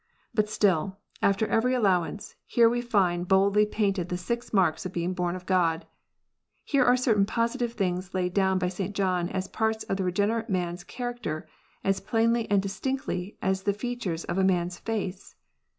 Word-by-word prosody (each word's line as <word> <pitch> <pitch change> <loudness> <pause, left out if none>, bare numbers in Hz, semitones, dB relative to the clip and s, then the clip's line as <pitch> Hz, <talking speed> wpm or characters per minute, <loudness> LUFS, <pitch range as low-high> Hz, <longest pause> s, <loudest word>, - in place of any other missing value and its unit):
But 215 -1 +1
still, 190 -3 +1 0.2
after 200 +2 +3
every 250 +4 +2
allowance, 195 -4 0
here 235 -1 +5
we 240 +1 +1
find 185 -7 +1
boldly 200 +2 +4
painted 195 -5 0
the 180 - -1
six 235 +7 -4
marks 180 -6 +2
of 185 - -5
being 175 0 -2
bom 180 -1 -1
of 180 -1 -8
God. 170 -3 +1 0.8
Here 280 -3 +2
are 250 0 +5
certain 220 -6 +2
positive 235 +1 -1
things 185 -3 -2
laid 180 -1 0
down 190 -1 +2
by 180 -1 0
St. 190 +2 -4
John 185 -3 +1
as 190 0 -3
parts 220 0 -1
of 195 - -2
the 195 - -1
regenerate 210 +5 0
man 180 -3 0
s 175 - -9
character, 240 -11 -5 0.4
as 195 0 +1
plainly 230 +3 +1
and 200 -1 +3
distinctly 200 -2 -3
as 190 0 +1
the 200 +1 +1
features 210 -6 -3
of 190 - -2
a - - +3
man 180 -2 +3
s 175 0 -7
face. 200 -4 -4
195 Hz, 180 wpm, -27 LUFS, 180-225 Hz, 0.8 s, here